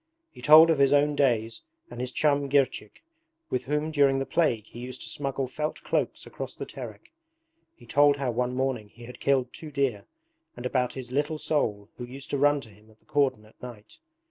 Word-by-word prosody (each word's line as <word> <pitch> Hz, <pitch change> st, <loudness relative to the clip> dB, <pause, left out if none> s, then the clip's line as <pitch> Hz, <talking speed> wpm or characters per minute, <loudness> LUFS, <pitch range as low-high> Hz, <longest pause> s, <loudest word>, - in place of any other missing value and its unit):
He -, -, -14 dB
told 160 Hz, +2 st, +8 dB
of 155 Hz, -, +1 dB
his 140 Hz, 0 st, +5 dB
own 145 Hz, +1 st, +3 dB
days 115 Hz, -5 st, +1 dB, 0.3 s
and -, -, -6 dB
his 125 Hz, 0 st, -3 dB
chum 140 Hz, -1 st, +1 dB
Girchik, 135 Hz, -6 st, 0 dB, 0.5 s
with 125 Hz, 0 st, -1 dB
whom 150 Hz, +3 st, -1 dB
during 140 Hz, -3 st, +3 dB
the 135 Hz, -, -1 dB
plague 130 Hz, -11 st, +1 dB
he 120 Hz, -, -12 dB
used 125 Hz, +1 st, -6 dB
to -, -, -6 dB
smuggle 135 Hz, -1 st, -2 dB
felt 150 Hz, +4 st, -4 dB
cloaks -, -, -1 dB
across -, -, -7 dB
the -, -, -6 dB
Terek. -, -, -10 dB, 0.6 s
He -, -, -17 dB
told 145 Hz, 0 st, +4 dB
how 135 Hz, -3 st, -1 dB
one 125 Hz, +1 st, -1 dB
morning 130 Hz, -5 st, -2 dB
he 120 Hz, -, -15 dB
had 125 Hz, -, -11 dB
killed 130 Hz, -3 st, +1 dB
two 155 Hz, -, -9 dB
deer, 135 Hz, -8 st, -1 dB, 0.5 s
and 120 Hz, -, -7 dB
about 125 Hz, -1 st, 0 dB
his 125 Hz, -2 st, -8 dB
'little 145 Hz, +3 st, 0 dB
soul' 105 Hz, -11 st, -1 dB
who 125 Hz, -, -6 dB
used 135 Hz, +3 st, -8 dB
to 140 Hz, -, 0 dB
run 145 Hz, 0 st, +3 dB
to 115 Hz, -, -13 dB
him 105 Hz, +1 st, -20 dB
at 110 Hz, -, -22 dB
the -, -, -36 dB
cordon 135 Hz, -7 st, 0 dB
at 110 Hz, -, -23 dB
night. 115 Hz, -4 st, -11 dB
135 Hz, 210 wpm, -27 LUFS, 120-145 Hz, 0.6 s, told